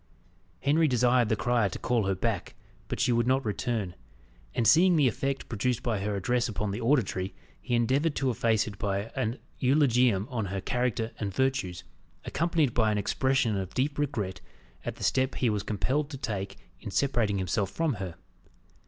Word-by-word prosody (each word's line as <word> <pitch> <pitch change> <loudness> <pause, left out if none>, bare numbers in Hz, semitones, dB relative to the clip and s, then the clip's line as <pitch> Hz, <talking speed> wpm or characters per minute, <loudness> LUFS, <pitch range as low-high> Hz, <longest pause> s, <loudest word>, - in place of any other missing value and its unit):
Henry 155 +3 +3
desired 125 -2 +3
the 110 - +3
crier 120 -1 +1
to - - -6
call 115 -4 0
her 95 - +1
back, 100 -1 -2 0.3
but - - -4
she - - +3
would 120 0 +2
not 130 0 +2
return; 105 -2 -2 0.6
and 115 - +2
seeing 175 - +6
the 145 -4 +4
effect 135 +4 -2
produced 125 +2 -1
by 110 -4 0
her 100 +1 -2
address 120 +5 0
upon 105 -1 -2
the 105 - -4
auditory, 100 -7 +1 0.3
he 120 - -1
endeavoured 135 +6 +2
to 135 -2 +1
efface 110 -1 +2
it 100 -3 -8
by 100 +2 -2
an 115 +4 -1 0.2
eulogium 125 -6 +3
on 115 -4 -1
her 100 0 -3
character 120 0 -1
and 100 -3 -3
virtues, 130 -10 0 0.4
accompanied 160 -5 +1
by 110 -2 +3
an 105 - 0
expression 125 +2 +1
of 95 -2 -4
deep 140 +3 0
regret 120 -10 -2 0.4
at - - -4
the - - -9
step 130 0 +1
he 120 -3 +1
was 105 -1 -1
compelled 130 +9 -1
to 140 - -6
take 100 -6 -4 0.2
in 105 - -7
separating 115 -3 +1
himself 95 +1 0
from 160 +2 0
her. 90 -3 -5
120 Hz, 180 wpm, -28 LUFS, 100-130 Hz, 0.6 s, seeing